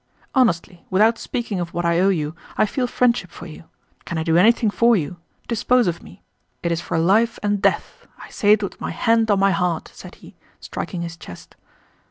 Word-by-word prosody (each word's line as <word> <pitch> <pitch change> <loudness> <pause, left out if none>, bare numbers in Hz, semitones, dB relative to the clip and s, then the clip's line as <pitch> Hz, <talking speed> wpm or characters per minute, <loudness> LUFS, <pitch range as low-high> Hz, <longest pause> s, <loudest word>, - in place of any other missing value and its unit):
"Honestly, 180 - +1
without 220 +4 +3
speaking 230 -6 -4
of 170 -1 -5
what 175 0 -1
I 170 0 +2
owe 190 +2 +4
you, 155 -4 -1 0.2
I - - +4
feel 250 +4 -2
friendship 240 -7 +1
for - - -11
you. 160 0 -11 0.4
Can 170 - -5
I 160 - -1
do 165 0 +1
anything 220 +4 +4
for 235 +2 +4
you? 175 -1 -3 0.3
Dispose 245 +1 +2
of 170 -1 -2
me. - - -16 0.4
It 170 - 0
is 170 0 -1
for 170 - -3
life 215 +8 +2
and 205 -1 0
death. - - -1
I - - -13
say 205 0 +3
it 210 -1 +1
with 200 - -6
my - - -3
hand 225 -1 +1
on 200 -2 +3
my 195 0 +3
heart!" 180 -4 -1
said - - -12
he, - - -16 0.2
striking 175 -3 -5
his 170 -1 -7
chest. 90 - -12
195 Hz, 210 wpm, -21 LUFS, 170-225 Hz, 0.4 s, owe